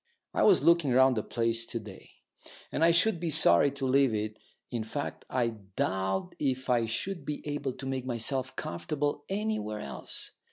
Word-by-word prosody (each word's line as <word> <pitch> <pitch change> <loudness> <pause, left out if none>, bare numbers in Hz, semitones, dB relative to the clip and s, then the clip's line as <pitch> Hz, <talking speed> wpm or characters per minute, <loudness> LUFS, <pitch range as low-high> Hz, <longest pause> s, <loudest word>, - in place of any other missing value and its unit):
I - - +1
was 405 - +5
looking 170 -4 +4
round 130 +1 +5
the 110 - 0
place 115 +1 -1
to 115 - -3
day, 105 -3 -12 0.6
and 160 - 0
I 165 - +7
should 175 +3 +3
be 170 -1 -2
sorry 85 - +5
to 140 -1 -3
leave 130 -3 +3
it 105 0 -3 0.3
in 120 -3 -2
fact, 140 +6 -5
I 125 -2 +1 0.3
doubt 95 - -1
if 130 -2 -1
I 115 -2 +2
should 180 - -2
be 150 - -5
able 145 -3 -2
to 135 - -8
make 130 -1 -3
myself 130 +2 -1
comfortable 145 - -3
anywhere 195 - -2
else. 70 - -4
130 Hz, 175 wpm, -29 LUFS, 115-150 Hz, 0.6 s, I